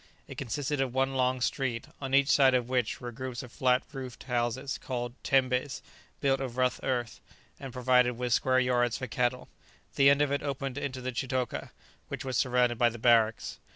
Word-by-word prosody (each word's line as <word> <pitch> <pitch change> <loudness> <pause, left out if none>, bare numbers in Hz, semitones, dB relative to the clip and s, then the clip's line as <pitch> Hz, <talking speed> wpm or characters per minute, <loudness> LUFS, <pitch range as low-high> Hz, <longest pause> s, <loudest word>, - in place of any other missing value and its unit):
It - - -9
consisted 140 +4 -2
of 130 -2 -2
one 135 0 +1
long 130 -1 +1
street, 120 -3 -1 0.2
on 135 -1 0
each 140 +1 +4
side 135 -3 +5
of 125 -2 0
which 125 -3 -1
were 120 -1 -6
groups 130 0 -6
of 125 - -11
flat 125 0 +2
roofed 130 -3 -7
houses 125 +2 -2
called 120 -2 -4
tembés, 130 0 +1 0.4
built 135 -1 +2
of 130 -2 -5
rough 130 0 +1
earth, 120 -3 -2 0.4
and 135 -2 -7
provided 125 0 +3
with 120 0 -1
square 130 +1 +2
yards 120 -2 +1
for 130 - -4
cattle. 125 +1 -1 0.5
The 140 0 +7
end 140 +1 +4
of 145 - -1
it 140 - 0
opened 135 -1 -3
into 130 -3 -4
the 130 +1 -3
chitoka, 130 0 -3 0.4
which - - -6
was 130 -1 -3
surrounded 125 -1 +2
by 120 -1 +5
the 120 - -8
barracks. 115 -1 +2
130 Hz, 190 wpm, -29 LUFS, 120-135 Hz, 0.5 s, The